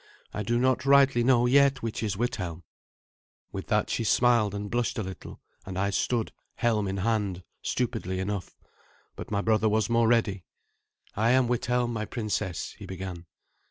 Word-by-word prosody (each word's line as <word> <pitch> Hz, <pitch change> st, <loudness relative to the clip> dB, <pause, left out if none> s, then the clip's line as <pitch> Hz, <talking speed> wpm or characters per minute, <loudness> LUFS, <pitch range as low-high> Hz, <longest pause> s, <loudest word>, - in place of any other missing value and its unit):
I 105 Hz, -, -3 dB
do 115 Hz, +3 st, 0 dB
not 130 Hz, +1 st, +2 dB
rightly 135 Hz, -3 st, +5 dB
know 120 Hz, -1 st, +4 dB
yet 135 Hz, 0 st, +4 dB
which 115 Hz, -1 st, -3 dB
is 105 Hz, -3 st, -2 dB
Withelm." 90 Hz, -7 st, -3 dB, 0.9 s
With -, -, -6 dB
that -, -, +1 dB
she -, -, 0 dB
smiled 115 Hz, -2 st, +3 dB
and 100 Hz, 0 st, -4 dB
blushed 120 Hz, +3 st, -1 dB
a 110 Hz, -, -1 dB
little, 95 Hz, 0 st, -8 dB, 0.2 s
and 95 Hz, -1 st, -7 dB
I 100 Hz, +1 st, 0 dB
stood, 115 Hz, +3 st, 0 dB, 0.2 s
helm 110 Hz, -4 st, +1 dB
in 95 Hz, +1 st, -3 dB
hand, 100 Hz, -3 st, -1 dB, 0.2 s
stupidly 110 Hz, -7 st, -2 dB
enough. 95 Hz, -1 st, -4 dB, 0.6 s
But -, -, -8 dB
my 100 Hz, -1 st, 0 dB
brother 110 Hz, 0 st, +2 dB
was 110 Hz, +1 st, +1 dB
more 115 Hz, -1 st, +4 dB
ready. 110 Hz, -5 st, +1 dB, 0.7 s
"I 110 Hz, +3 st, +2 dB
am 130 Hz, -1 st, +4 dB
Withelm, 120 Hz, 0 st, 0 dB
my 110 Hz, -1 st, -2 dB
princess 105 Hz, -6 st, -3 dB
" -, -, -25 dB
he 100 Hz, -, -9 dB
began. 90 Hz, -2 st, -7 dB
110 Hz, 170 wpm, -27 LUFS, 100-120 Hz, 0.9 s, rightly